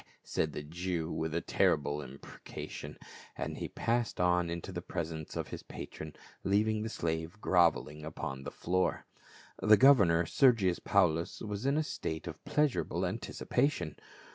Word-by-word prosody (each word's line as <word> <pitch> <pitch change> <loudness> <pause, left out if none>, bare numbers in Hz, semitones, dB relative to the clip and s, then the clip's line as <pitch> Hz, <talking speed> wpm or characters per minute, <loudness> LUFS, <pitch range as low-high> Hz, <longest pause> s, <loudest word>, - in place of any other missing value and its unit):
said 80 - -1
the 75 - -5
Jew 85 +1 -3
with 80 0 -2
a 85 - 0
terri - - +3
ble 75 +1 -3
imprecation, 70 -1 -8 0.4
and - - -4
he - - -3
passed 120 0 -1
on 90 -1 +3
into 85 +3 -4
the 90 -1 -4
presence 80 -2 -5
of - - -3
his - - -6
patron, 80 -1 -8 0.3
leaving 105 +2 +2
the 110 - -3
slave 80 0 -3
groveling 85 -5 +2
upon 75 -3 -5
the 70 - -5
floor. 90 +4 0 0.6
The 110 0 +7
governor, 100 -11 +6
Sergius 105 - +4
Paulus, 85 -3 +2
was 105 +3 -3
in 140 +2 +3
a 155 - +2
state 80 - -4
of 85 -3 -8
pleasurable 140 - +1
anticipation. 120 - -1
85 Hz, 150 wpm, -32 LUFS, 80-105 Hz, 0.6 s, The